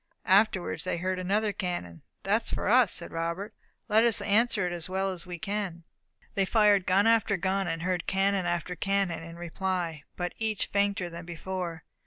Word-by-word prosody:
Afterwards 190 -1 +3
they 185 - -1
heard 185 +2 -2
another 205 +3 0
cannon. 175 - -4 0.2
"That - - +1
is - - -4
for - - -2
us," - - +4
Robert 170 +6 -4
said; - - -41
"let 220 +1 +6
us 235 -2 +4
answer 215 -1 +2
it 175 - -2
as 170 0 -4
well 190 +1 0
as 185 0 -8
we 175 -1 -5
can." 195 -2 -3 0.5
They 195 - +2
fired 205 -2 +4
gun 190 +3 +4
after 225 -3 +3
gun, 190 +1 0
and 165 -1 -2
heard 180 -1 -1
cannon 195 -1 +1
after 175 +1 -2
cannon 195 -3 0
in 165 0 -9
reply, 175 -2 -3
but 180 -1 -3
each 220 -2 0
fainter 200 -2 +1
than 170 0 -8
before. 175 -1 -5
185 Hz, 185 wpm, -28 LUFS, 175-200 Hz, 0.5 s, let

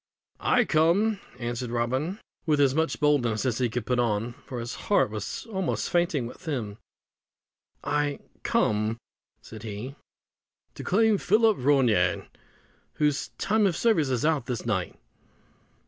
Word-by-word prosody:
"I 245 -2 +3
come," 190 +7 +3 0.2
answered 120 0 -3
Robin, 130 - -1 0.3
with 150 -2 +3
as 140 -2 +4
much 160 +2 0
boldness 130 -8 +2
as 125 -2 0
he 125 -2 +1
could 115 0 -3
put 125 -1 0
on, 115 0 0
for 125 -3 -5
his 120 0 -5
heart 200 - +1
was 105 - -5
almost 190 -6 -2
fainting 170 -7 +1
within 145 +5 -5 0.2
him; 100 - -14 1.1
"I 145 0 0 0.2
come," 110 +1 +1 0.5
said 110 - -10
he, 110 +4 -6 0.8
"to - - -8
claim 215 +1 +3
Philip 220 +1 +3
Ronayne, 130 -4 +3 0.7
whose 150 -2 +1
time 210 0 +2
of 170 -4 -1
service 195 - +2
is 125 +1 0
out 155 -6 +1
this 125 -2 -3
night." 100 -6 -2
140 Hz, 140 wpm, -27 LUFS, 120-170 Hz, 1.1 s, as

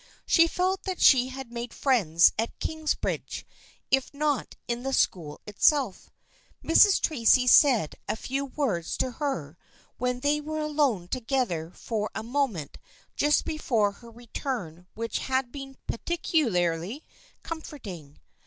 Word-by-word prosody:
She 330 -1 +5
felt 370 +3 0
that 375 -2 -3
she 255 -2 +6
had 260 -2 -8
made 240 0 -6
friends 180 - +4
at 225 +2 -3
Kingsbridge, 315 -1 -3 0.5
if 270 -1 +2
not 295 -2 -1
in 235 0 -2
the 270 +1 -3
school 160 - 0
itself. 220 +2 +1 0.5
Mrs. 405 -2 +6
Tracy 250 -3 +3
said 250 - +5 0.2
a - - 0
few 270 +5 -3
words 235 - -2
to 255 - -1
her 180 - -4 0.4
when 250 0 -1
they 295 +2 +1
were 310 +1 -5
alone 290 - 0
together 230 - -1
for 210 +3 -4
a 220 - -3
moment 235 - -2 0.4
just 295 +1 +2
before 230 -10 +1
her 235 +4 -15
return 225 - -6
which 230 +1 -3
had 260 -2 -1
been 270 -2 -9
peculiarly 225 - -1 0.4
comforting. 205 - -8
250 Hz, 130 wpm, -27 LUFS, 210-290 Hz, 0.5 s, she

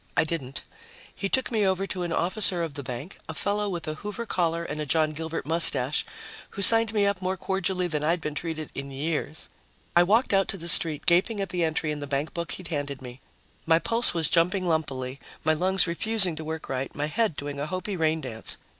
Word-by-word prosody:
I - - +5
didn't. 150 -5 -5 0.5
He 195 - -4
took 260 +3 0
me 220 -3 +1
over 190 0 +1
to 185 -2 -4
an 175 -1 -3
officer 180 0 +4
of 160 -3 -5
the 140 - -5
bank, 125 +6 -7
a 160 - -5
fellow 205 +5 -1
with 175 -4 -5
a 155 - -2
Hoover 210 +3 -5
collar 170 -5 -1
and 155 -2 -5
a - - -3
John 155 0 +2
Gilbert 160 -1 -5
mustache, 150 -4 +5 0.4
who 200 - -3
signed 225 +2 +8
me 210 -2 +2
up 200 -2 0
more 185 +1 -2
cordially 190 0 -1
than 155 -4 -2
I'd 165 +3 +1
been 150 -2 -4
treated 155 -1 -5
in 140 0 -6
years. 150 +2 -4 0.5
I 175 - +7
walked 210 +6 +2
out 195 0 +3
to 195 - -4
the 170 -1 -8
street, 155 -2 +2
gaping 185 +5 +3
at 195 - -3
the 180 -1 -1
entry 160 -1 -1
in 150 - -4
the 145 - -6
bankbook 150 +3 -3
he'd 185 - -8
handed 145 -3 -3
me. 125 0 -11 0.5
My 165 0 +5
pulse 230 +7 +2
was 165 -3 0
jumping 180 +3 +1
lumpily, 135 -5 -2 0.2
my 155 0 +3
lungs 185 +4 +2
refusing 185 +1 +2
to 160 - -5
work 160 0 -6
right, 130 0 -4
my 145 - -1
head 210 +2 0
doing 145 0 -5
a 145 - -3
Hopi 185 +3 -4
rain 160 -1 0
dance. 110 -5 -4
165 Hz, 220 wpm, -26 LUFS, 150-190 Hz, 0.5 s, signed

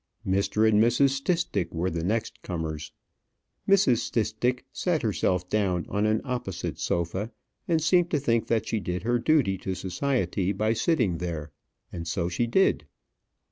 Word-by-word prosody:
Mr. 100 +3 +2
and 105 -1 +4
Mrs. 125 +4 +4
Stistick 165 - 0
were 85 +2 -1
the 85 0 -3
next 110 +5 -2
comers. 80 -3 -4 0.8
Mrs. 190 -12 +5
Stistick 120 +2 -1
sat 175 -4 0
herself 90 -4 0
down 95 -4 0
on 105 +1 +1
an 110 0 +1
opposite 125 -9 -4
sofa, 85 +5 -1 0.4
and 160 -3 +1
seemed 175 +1 +3
to 150 - +1
think 115 -4 +1
that 110 -2 0
she 110 - 0
did 90 -1 -3
her 120 +1 +1
duty 120 - +2
to 95 0 -3
society 100 0 -1
by 110 +3 +1
sitting 115 - +1
there. 80 -4 -4 0.4
And 85 -1 -5
so 85 0 -1
she 120 +7 0
did. 190 +11 +2
110 Hz, 155 wpm, -27 LUFS, 90-125 Hz, 0.8 s, Mrs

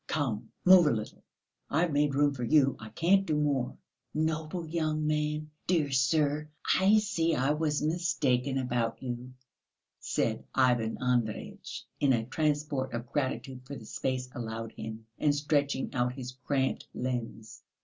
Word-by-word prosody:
Come, 120 -7 -2 0.2
move 180 -3 +8
a - - +4
little! 110 -2 -4 0.5
I've 165 +3 +2
made 145 -1 +2
room 145 0 +3
for 125 -3 -5
you, 135 +2 +4
I 110 - -8
can't 175 - +3
do 155 -6 -1
more!" 140 -4 0 0.4
"Noble 160 +2 -1
young 155 -1 -1
man! 150 0 -1 0.2
Dear 160 -6 +2
sir! 145 +3 +2 0.3
I 200 +3 +6
see 170 -6 +1
I 135 +1 +2
was 150 -1 0
mistaken 150 -6 +1
about 125 -2 -1
you," 125 0 -5 0.7
said - - -1
Ivan 120 -4 +2
Andreyitch, 120 -4 -2
in 140 -2 +4
a 115 -2 0
transport 145 0 -1
of 120 +1 -5
gratitude 130 -2 -2
for 140 - -6
the 110 - -9
space 130 +3 -2
allowed 115 -1 -5
him, 110 0 -7
and 145 -1 +3
stretching 145 -2 0
out 125 0 +1
his 125 -1 -6 0.2
cramped 135 -2 0
limbs. 120 -3 -4
140 Hz, 150 wpm, -30 LUFS, 125-155 Hz, 0.7 s, move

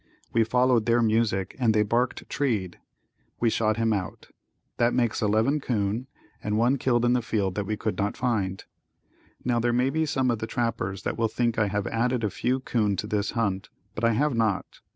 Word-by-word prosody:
We 115 - +4
followed 125 0 +2
their 120 0 +4
music 110 -4 +1
and 115 -4 +3
they 105 - +4
barked 120 +4 -1
treed. 105 -11 -1 0.6
We 115 -1 +2
shot 110 -1 +1
him 115 -1 +2
out. 95 -3 -5 0.5
That 120 0 +2
makes 120 -3 +1
eleven 110 +7 +2
'coon 115 -1 -1 0.4
and 105 0 0
one 125 +4 +2
killed 120 -2 +2
in 120 - +3
the 125 - +2
field 105 -5 -1
that 100 0 -3
we 105 +1 -2
could 90 - -3
not 100 +1 -1
find. 100 -7 -1 0.8
Now 120 -1 +2
there 120 +1 +1
may 125 +3 +2
be 160 +1 0
some 130 -4 +1
of 115 - -2
the 110 - -3
trappers 115 -6 -2
that - - -3
will 115 - +3
think 115 +1 0
I 105 - +3
have 100 0 -2
added 120 +1 0
a 105 - 0
few 130 +7 0
'coon 105 -6 0
to 100 - -3
this 105 -1 -1
hunt, 100 -3 -1 0.2
but 105 - -6
I 115 0 +4
have 145 +5 +1
not. 110 -4 -1
115 Hz, 205 wpm, -26 LUFS, 105-120 Hz, 0.8 s, We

